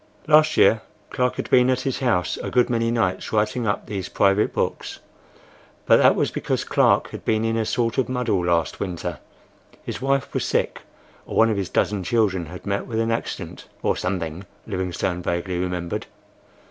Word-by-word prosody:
Last 155 0 +5
year 110 - +5 0.3
Clark 125 0 0
had - - -4
been 125 0 +5
at 130 -1 +1
his 135 - -2
house 115 -10 +1
a - - -5
good 125 0 +2
many 115 -1 +1
nights 95 -6 -1
writing 110 +2 0
up 100 - -1
these 95 -3 -5
private 100 +1 +2
books; - - -3 0.9
but - - +6
that - - +5
was - - 0
because - - -2
Clark - - +3
had - - -8
been 110 0 +1
in 115 0 0
a 115 -1 0
sort 115 +2 0
of 125 - 0
muddle 120 -7 0
last 85 -1 0
winter,—his 90 +6 -8
wife 135 0 0
was - - -1
sick, - - -1 0.5
or - - -6
one 115 0 +5
of 105 - -1
his 95 -2 -2
dozen 100 -2 0
children 95 -4 +1
had 90 +3 -10
met 100 0 -2
with 115 -2 -2
an 115 0 +1
accident,—or 115 - -3
something,—Livingstone 90 +1 -3
vaguely 90 +1 -2
remembered. 90 -1 -3
105 Hz, 170 wpm, -23 LUFS, 90-120 Hz, 0.9 s, but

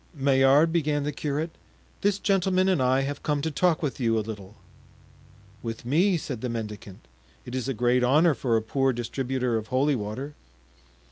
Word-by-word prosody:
"Maillard," 140 +3 +4
began 150 -3 +1
the 150 - -2
curate, 150 +3 -3 0.5
"this 200 -1 +2
gentleman 190 -2 +1
and 185 -7 +2
I 130 +1 +3
have 140 +1 -4
come 150 -1 0
to 160 - -1
talk 170 +1 +1
with 140 -2 -2
you 115 -3 +1
a 110 - -1
little." 105 -2 -8 1.1
"With 115 0 -6
me!" 175 +9 +3
said 130 -7 -6
the 125 - -3
mendicant; 105 - -7 0.4
"it 125 - -8
is 130 -1 -2
a 135 - -1
great 125 +2 +2
honor 150 +6 +4
for 120 -4 0
a 110 - -2
poor 135 +3 +1
distributor 125 0 -2
of 110 0 -5
holy 135 +4 +1
water." 125 +6 -5
135 Hz, 180 wpm, -26 LUFS, 120-150 Hz, 1.1 s, Maillard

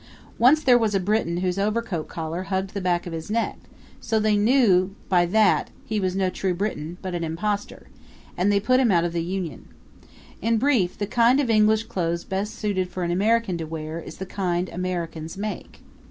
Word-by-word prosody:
Once 285 +6 +5
there 250 -3 +6
was 215 -3 +1
a - - +3
Briton 185 -3 0
whose 180 +1 -1
overcoat 210 -5 -1
collar 165 +1 -4
hugged 190 0 -2
the 200 - -3
back 175 -1 0
of 175 - -6
his 160 +2 -6
neck; 230 +2 -1 0.4
so 225 -1 0
they 215 -1 +2
knew 205 -4 +3
by 175 -2 +4
that 210 +2 +3 0.2
he 215 -1 -1
was 185 -2 -1
no 190 -1 +1
true 185 -1 -1
Briton, 175 -4 -3
but 185 -1 -4
an 175 -1 -2
impostor 200 +6 -3 0.5
and 190 +3 +2
they 200 - +3
put 255 +5 +3
him 255 -3 +3
out 170 -2 +3
of 170 - -2
the 170 - 0
union. 175 -5 -4 0.7
In 230 +2 +2
brief, 220 -8 +1
the 205 - -1
kind 240 +5 +3
of 260 -5 +1
English 215 0 +4
clothes 170 -6 -2
best 195 +2 -3
suited 190 -3 -1
for 180 0 -4
an 170 - -1
American 205 0 +1
to 165 - -3
wear 155 0 -5
is - - -10
the 190 - -5
kind 180 -2 -2
Americans 170 -2 -4
make. 210 +1 -6
190 Hz, 200 wpm, -24 LUFS, 175-215 Hz, 0.7 s, there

